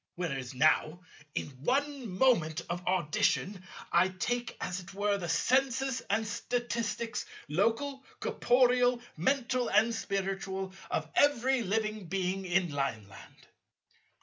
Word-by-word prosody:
Whereas 135 -8 -4
now, 155 +4 +3 0.3
in - - -1 0.2
one 275 - 0
moment 170 -12 +3
of 175 +1 -3
audition, 185 +2 +1 0.3
I 175 +2 +4
take 240 +6 -2
as 180 0 -3
it 185 +1 -11
were 205 0 +1
the 175 -2 -4
census 260 - +2
and 220 +2 +1
statistics, 235 +1 -2 0.2
local, 230 - 0 0.2
corporeal, 245 0 +3 0.2
mental 250 - +1
and 220 +3 +4
spiritual, 195 -2 -3 0.2
of - - -1
every 265 -2 +3
living 215 -1 -1
being 190 +1 -1
in 180 -2 +1
Lineland. 110 -9 -5
200 Hz, 115 wpm, -31 LUFS, 180-245 Hz, 0.3 s, I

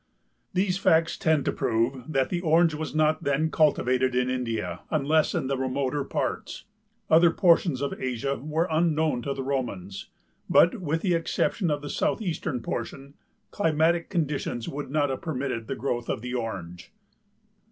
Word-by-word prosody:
These 185 0 0
facts 165 -3 +3
tend 160 -3 +1
to - - +1
prove 120 +4 -1
that 135 -3 +1
the 175 -1 -2
Orange 165 0 +4
was 155 +1 -5
not 155 0 +2
then 145 +3 +1
cultivated 130 -5 +2
in 125 0 +1
India 125 -3 -3
unless 155 +1 +2
in - - -1
the 135 +1 0
remoter 130 +2 -1
parts. - - -4 0.4
Other 165 +2 +6
portions 165 -5 +3
of 140 - -1
Asia 130 +2 -1
were 155 +5 -1
unknown 155 -4 +1
to 140 +2 -3
the 135 - -4
Romans 100 -9 -4 0.4
but, 185 +5 +4
with 160 -1 -1
the 185 -3 +2
exception 170 +2 0
of 145 -1 -1
the - - -5
southeastern 165 - -1
portion, 140 +4 -5 0.4
climatic 165 -1 +1
conditions 145 -8 -2
would 145 0 -5
not 145 -1 +1
have 130 - -4
permitted 130 -7 -3
the - - -3
growth 120 -1 -3
of - - -2
the 125 0 -4
Orange. 90 -8 -5
145 Hz, 160 wpm, -26 LUFS, 130-160 Hz, 0.4 s, Other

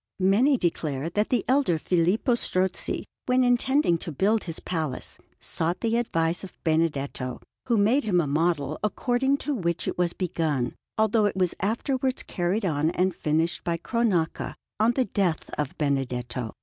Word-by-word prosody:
Many 220 +9 +4
declare 160 - -1
that 210 +4 0
the 245 - +1
elder 260 - +3
Filippo 180 - +2
Strozzi, 185 -5 0 0.2
when 255 0 +4
intending 245 - +3
to 165 - -5
build 205 +9 +1
his 165 -2 -3
palace, 155 -7 -3 0.2
sought 165 +2 -2
the 230 0 +1
advice 170 -8 0
of 195 - -10
Benedetto, 145 -6 0 0.3
who 235 -3 +3
made 230 +8 +3
him 185 -5 +3
a 170 - +2
model, 155 0 0
according 245 +6 +1
to 295 - -2
which 170 -8 -1
it - - -3
was 175 -1 +1
begun, 160 -9 -1 0.2
although 220 0 +3
it 205 - 0
was 185 -2 +2
afterwards 255 +5 -1
carried 185 +4 -1
on 155 -2 +1
and 185 +2 +1
finished 160 +3 0
by 170 -1 -1
Cronaca 190 -4 0 0.2
on 225 +3 +4
the 260 0 +1
death 185 -5 -1
of 150 -2 -3
Benedetto. 125 -5 -2
180 Hz, 160 wpm, -26 LUFS, 160-225 Hz, 0.3 s, Many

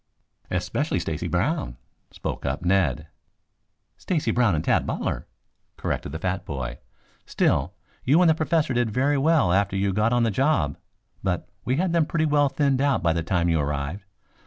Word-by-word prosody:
"Especially - - -1
Stacy - - -3
Brown," - - -1 0.3
spoke - - -5
up 70 +6 -2
Ned. 80 -6 +2 0.9
"Stacy 165 -5 -1
Brown 120 -8 +3
and 75 - -1
Tad - - +1
Butler," - - -3 0.5
corrected - - -3
the 80 - -4
fat 95 +3 -2
boy. 65 -4 -5 0.5
"Still, - - +1 0.3
you 145 +7 +4
and 180 - +5
the 160 - +6
Professor 155 -3 0
did 120 -1 +1
very 135 +6 +1
well 145 - +3
after 100 0 +1
you 100 0 0
got 105 +3 +2
on 120 -1 +3
the 115 - +2
job. 135 - +1 0.5
But 90 -3 -2 0.2
we 130 - +1
had 175 +3 0
them 165 -3 +2
pretty 160 -1 0
well 145 -2 +3
thinned 135 -1 +1
out 140 -7 +1
by 85 -1 +3
the 85 - -1
time 85 +1 0
you 80 -2 +2
arrived. 75 +6 -3
105 Hz, 175 wpm, -24 LUFS, -, 0.9 s, the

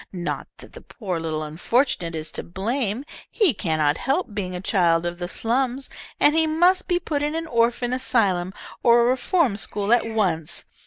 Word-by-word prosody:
Not 180 -2 -4
that - - -14
the - - -11
poor 185 -8 -5
little 155 -1 -3
unfortunate 170 - 0
is 155 -1 -5
to - - -3
blame. 220 +6 -2 0.2
He 405 - +3
cannot 155 -6 0
help 275 - -1
being 185 -3 -3
a - - -4
child 175 -3 +2
of 175 0 -4
the 175 - -3
slums, 255 +6 -1 0.3
and 295 - +5
he 320 0 +3
must 350 +4 +3
be 350 - +2
put 300 -4 -2
in 295 +2 -1
an 330 0 -2
orphan 240 -2 +1
asylum 200 -8 +1 0.3
or 235 0 +5
a - - +3
reform 255 - +1
school 205 +3 +1
at 240 -1 +3
once. 185 -8 -1
225 Hz, 180 wpm, -23 LUFS, 175-270 Hz, 0.3 s, and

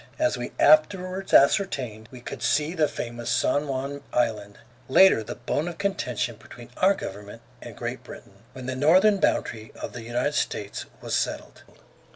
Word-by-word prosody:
As 310 0 +1
we 120 - -5
afterwards 185 +5 +3
ascertained, 130 - +2
we 125 -2 -11
could - - -8
see 150 +3 +1
the 160 -4 +2
famous 120 -2 -6
San 130 +4 +1
Juan 140 +1 -4
Island, 105 -4 -1 0.3
later 160 -5 +6
the - - -7
bone 155 +4 -2
of 175 -2 -6
contention 125 - -2
between 120 +2 -13
our 195 +2 +4
government 100 - -8 0.2
and - - -10
Great - - -5
Britain, - - -13 0.2
when 130 -1 -9
the 130 0 -3
northern 185 +10 +5
boundary 110 -10 -1
of - - -6
the 120 - -7
United 120 +5 -1
States 105 -7 -3 0.2
was - - -4
settled. - - -3
130 Hz, 165 wpm, -25 LUFS, 120-165 Hz, 0.3 s, later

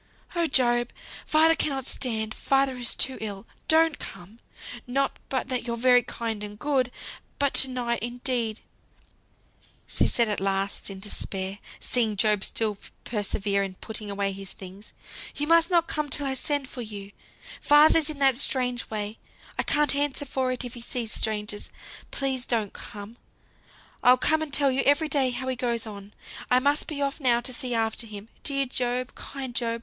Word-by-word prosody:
"Oh, 340 -1 +2
Job! 240 -3 +2 0.4
father 320 +1 +5
cannot 275 -5 0
stand 220 -5 -1
father 270 0 +1
is 245 -2 +1
too 265 - +1
ill. 205 -1 -5 0.2
Don't 320 -1 +4
come; 195 +4 -9 0.5
not 275 +3 0
but 260 - -1
that 250 -2 0
you're 235 0 -2
very 245 +1 +5
kind 225 -3 -4
and 205 0 -7
good; 265 -1 0 0.5
but 280 -1 +1
to 265 - +5
night 245 -2 -1
indeed," 240 -2 -2 1.3
said - - +3
she 235 - +3
at 215 -3 +1
last, 195 +1 -1
in 195 -1 -7
despair, 195 -1 -3 0.2
seeing 225 -4 +1
Job 210 -1 +3
still 215 -3 0 0.2
persevere 205 -2 -1
in 195 -1 -4
putting 215 +1 -5
away 200 0 -1
his 195 0 -8
things; 190 +2 -11 0.4
"you 295 - -1
must 330 +1 +5
not 340 -2 +3
come 300 -1 -2
till 285 +1 +2
I 270 - 0
send 285 +2 0
or - - -8
come - - -13
for 250 - -5
you. 205 -3 -7 0.5
Father's 300 +1 +6
in 305 - -5
that 270 -3 +4
strange 250 -3 +1
way, 215 0 -4 0.4
I - - +5
can't 295 -1 +2
answer 285 0 0
for 260 -1 -1
it 255 0 -3
if 245 - -7
he 240 - -9
sees 235 -1 -3
strangers. 210 -1 0 0.4
Please 265 -2 -1
don't 220 -4 0
come. 210 +3 -9 0.8
I'll 250 +1 +6
come 315 +4 +4
and 310 -2 -4
tell 280 -1 +3
you 260 +1 +1
every 290 +3 +3
day 275 -4 +3
how 260 +1 -2
he 260 - 0
goes 235 -2 -1
on. 205 -1 -9 0.3
I 250 - +5
must 285 +3 +2
be 285 -2 -2
off 275 +2 -2
now 245 -4 +3
to 255 +1 -4
see 250 -3 -3
after 225 +1 -1
him. 210 0 -9
Dear 275 -1 +2
Job! 250 0 -2
kind 265 -3 -7
Job! 235 -1 0
245 Hz, 180 wpm, -26 LUFS, 215-275 Hz, 1.3 s, Father's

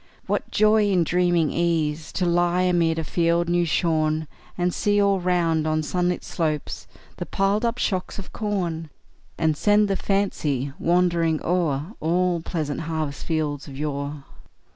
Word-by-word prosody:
What - - -2
joy 215 -1 +3
in 185 -3 +3
dreaming 175 -2 +2
ease 160 -2 0
to 185 - 0
lie 175 +1 +2
Amid 170 -3 +2
a 160 - -1
field 170 +2 +1
new 175 0 +2
shorn; 155 -2 +1 0.3
And 175 -1 0
see 205 0 +1
all 200 -1 +3
round, 170 -3 +1
on 155 0 0
sunlit 180 +2 -1
slopes, 155 -4 -3 0.3
The - - -5
piled 195 +3 +1
up 235 0 0
shocks 185 -3 -2
of 200 - -8
corn; 175 -7 -2 0.5
And 160 -2 +1
send 205 +5 +3
the 195 - +1
fancy 150 -10 -1
wandering 170 -2 +2
o'er 165 0 0
All 175 +1 +1
pleasant 155 -4 -3
harvest 155 -3 -4
fields 150 -3 -2
of 135 -2 -9
yore! 145 -1 -4
170 Hz, 150 wpm, -24 LUFS, 155-180 Hz, 0.5 s, joy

